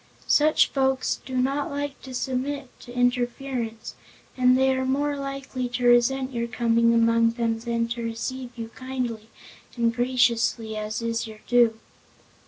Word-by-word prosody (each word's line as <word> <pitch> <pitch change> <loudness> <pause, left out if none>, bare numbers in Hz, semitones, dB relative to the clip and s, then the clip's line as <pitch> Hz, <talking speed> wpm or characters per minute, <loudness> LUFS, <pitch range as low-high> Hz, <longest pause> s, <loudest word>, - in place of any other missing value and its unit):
Such 305 +1 +4
folks 265 -1 0
do 260 -1 -3
not 275 +3 0
like 285 0 -4
to 260 -1 -8
submit 265 +2 -2
to 245 - -12
interference 245 -1 -1 0.4
and 255 0 +4
they 265 0 +3
are 260 - -1
more 285 +3 0
likely 275 -2 -4
to 245 0 -2
resent 255 +2 +3
your 235 -1 -2
coming 230 -1 +2
among 230 0 +3
them 230 -1 -1
than 230 0 -1
to 235 0 -3
receive 240 +3 -4
you 225 -1 -5
kindly 245 -3 -5 0.5
and 230 -1 +2
graciously, 235 -2 +1
as 215 +2 -4
is 230 0 -1
your 215 -1 -11
due." 235 -2 +3
245 Hz, 150 wpm, -25 LUFS, 230-265 Hz, 0.5 s, Such